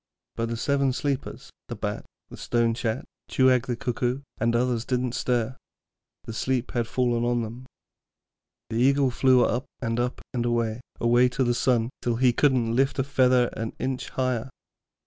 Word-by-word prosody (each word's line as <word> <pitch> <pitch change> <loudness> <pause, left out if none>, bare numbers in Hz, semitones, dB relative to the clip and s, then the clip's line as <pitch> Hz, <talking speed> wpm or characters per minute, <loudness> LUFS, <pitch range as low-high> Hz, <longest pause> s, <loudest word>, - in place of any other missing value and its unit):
But 115 0 -2
the 115 - -3
Seven 140 +1 +1
Sleepers, 140 0 -3 0.2
the - - -5
Bat, - - -4 0.3
the - - -8
Stone 115 -1 +1
chat, 115 0 -2 0.2
Cooag 130 -2 +3
the 125 - -1
Cuckoo, 125 +1 -2 0.2
and 115 +2 +2
the 120 - +2
others, 120 -2 0
didn't 125 -1 -1
stir 120 0 -1 0.7
the 115 - -7
sleep 130 +2 -1
had 120 -3 -1
fallen 120 -1 0
on 120 -1 +1
them. 120 +4 -8 1.0
The 115 - -1
Eagle 135 +2 +3
flew 130 0 +4
up 125 +3 -1
and 115 -1 -1
up 125 +1 -1
and 120 -2 0
away, 120 -1 0 0.2
away 120 +2 +4
to 130 +1 0
the 120 -1 +2
sun, 120 -1 +1
till 120 -1 0
he 125 0 +3
couldn't 120 -4 +2
lift 135 +2 +2
a 135 - +2
feather 130 -3 +3
an 115 0 -4
inch 130 -1 -3
higher. 130 -1 -1
125 Hz, 175 wpm, -26 LUFS, 115-130 Hz, 1.0 s, flew